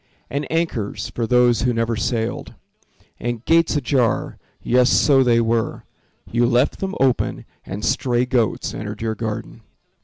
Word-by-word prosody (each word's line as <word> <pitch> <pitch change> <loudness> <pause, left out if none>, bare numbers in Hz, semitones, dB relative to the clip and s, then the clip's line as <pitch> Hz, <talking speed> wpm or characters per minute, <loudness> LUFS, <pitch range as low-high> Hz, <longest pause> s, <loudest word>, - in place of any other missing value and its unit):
And 140 +1 -3
anchors, 160 -11 -2
for 115 -2 -2
those 125 -1 +3
who 125 0 +1
never 115 0 0
sailed. 115 +1 -3 0.6
And 120 -1 -4
gates 165 -1 +3
ajar—yes, 125 -1 0
so 135 -3 +4
they 120 -2 +3
were; 115 0 -1 0.4
You 120 +1 +1
left 125 +2 +1
them 195 0 -3
open 130 -2 +1 0.2
and 100 +3 -4
stray 125 -1 +1
goats 125 -4 0
entered 105 +1 -6
your 110 -1 -1
garden. 110 -1 -5
120 Hz, 140 wpm, -21 LUFS, 115-130 Hz, 0.6 s, so